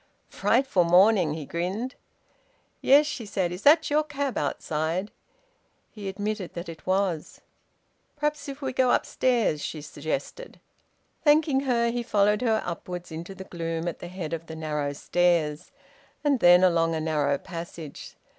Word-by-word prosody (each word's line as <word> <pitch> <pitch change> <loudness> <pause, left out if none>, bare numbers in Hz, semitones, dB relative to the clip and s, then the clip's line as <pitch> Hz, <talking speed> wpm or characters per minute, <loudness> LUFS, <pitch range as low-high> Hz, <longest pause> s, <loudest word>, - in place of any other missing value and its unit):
"Frightful 240 -7 +2
morning!" 180 -2 +4
he 155 -2 -6
grinned. 190 - -3 0.9
"Yes," 285 +3 +6
she 295 -5 -4
said. 190 -4 -2
"Is 180 +2 -6
that 310 +4 +5
your 305 +1 +3
cab 285 -4 -3
outside?" 160 +6 -2 0.8
He 205 -3 -6
admitted 205 -1 -4
that 170 0 -5
it 165 0 -10
was. 185 -4 -1 0.7
"Perhaps 295 -1 -2
if 275 +1 -8
we 260 -1 -2
go 255 -1 +3
upstairs," 235 -12 +1
she 155 - -4
suggested. 155 - -5 0.6
Thanking 295 -2 +4
her, 235 -1 +2
he 240 0 -2
followed 210 -1 +2
her 225 -3 +1
upwards 175 0 -6
into 170 +4 -7
the 190 - -8
gloom 165 -2 -4
at 170 - -4
the - - -7
head 175 -3 -6
of 165 0 -5
the 160 - -7
narrow 150 -2 -2
stairs, 165 -1 0 0.5
and 285 -3 +2
then 175 -1 +7
along 165 -2 +3
a - - -1
narrow 150 -3 +1
passage. 165 -2 -8
185 Hz, 150 wpm, -26 LUFS, 165-245 Hz, 0.9 s, then